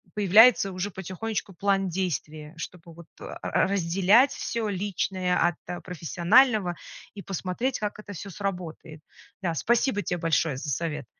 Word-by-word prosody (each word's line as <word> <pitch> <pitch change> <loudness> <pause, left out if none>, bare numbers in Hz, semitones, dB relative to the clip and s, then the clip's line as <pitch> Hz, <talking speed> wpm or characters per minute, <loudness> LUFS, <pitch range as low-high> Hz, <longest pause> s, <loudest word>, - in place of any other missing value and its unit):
появляется 210 +1 +6
уже 185 +2 -3
потихонечку 195 +2 -5
план 195 +1 +1
действий, 155 -4 -4
чтобы 170 0 -9
вот 170 +1 -13 0.2
р - - -7
разделять 195 +7 +3
всё 230 -2 -3
личное 185 -2 -1
от 175 +1 -1
профессионального 180 - +2 0.4
и 205 - -8
посмотреть, 195 +7 -3
как 210 0 -4
это 205 -1 -9
всё 200 +2 -8
сработает. 175 -5 -6 0.4
Да, 175 -3 -1
спасибо 235 - +1
те 180 - -2
большое 165 -3 0
за 145 +3 -5
совет! 150 -1 -3
185 Hz, 135 wpm, -26 LUFS, 170-205 Hz, 0.4 s, появляется